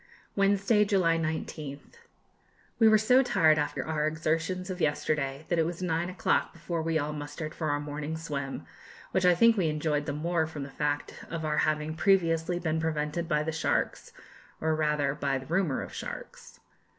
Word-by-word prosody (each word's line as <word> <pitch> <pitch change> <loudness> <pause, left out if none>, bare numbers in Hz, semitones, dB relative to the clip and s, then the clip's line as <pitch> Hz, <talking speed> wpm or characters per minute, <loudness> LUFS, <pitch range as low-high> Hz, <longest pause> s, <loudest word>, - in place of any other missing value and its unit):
Wednesday, 200 +2 +3
July 185 -5 +2
19th. 155 - -5 0.8
We 225 - +7
were 215 0 +7
so 250 +5 +5
tired 160 -11 +4
after 145 - -2
our 155 -1 0
exertions 165 +4 -1
of 180 -1 -5
yesterday, 145 -1 0
that 175 - +1
it 160 - +3
was 175 +1 -5
nine 170 0 0
o'clock 185 - 0
before 170 0 -3
we 160 0 0
all 150 0 -2
mustered 150 +1 -6
for 155 -2 -2
our 145 0 +1
morning 150 +2 -4
swim, 140 -4 -4 0.5
which 185 -1 +1
I 180 - +6
think 230 +5 +5
we 180 -4 +2
enjoyed 150 -1 -1
the 145 - -1
more 160 +2 0
from 155 -3 -6
the 140 - -8
fact 145 +1 -3
of 165 -2 -4
our 150 0 +1
having 155 0 -2
previously 175 -2 +2
been 160 -2 -1
prevented 160 +1 -2
by 150 0 +2
the 160 - -2
sharks, 160 0 -1 0.5
or 160 0 +1
rather 150 -3 +1
by 140 -2 -1
the 130 - -8
rumour 165 -3 0
of - - -9
sharks. - - -8
160 Hz, 180 wpm, -29 LUFS, 150-175 Hz, 0.8 s, We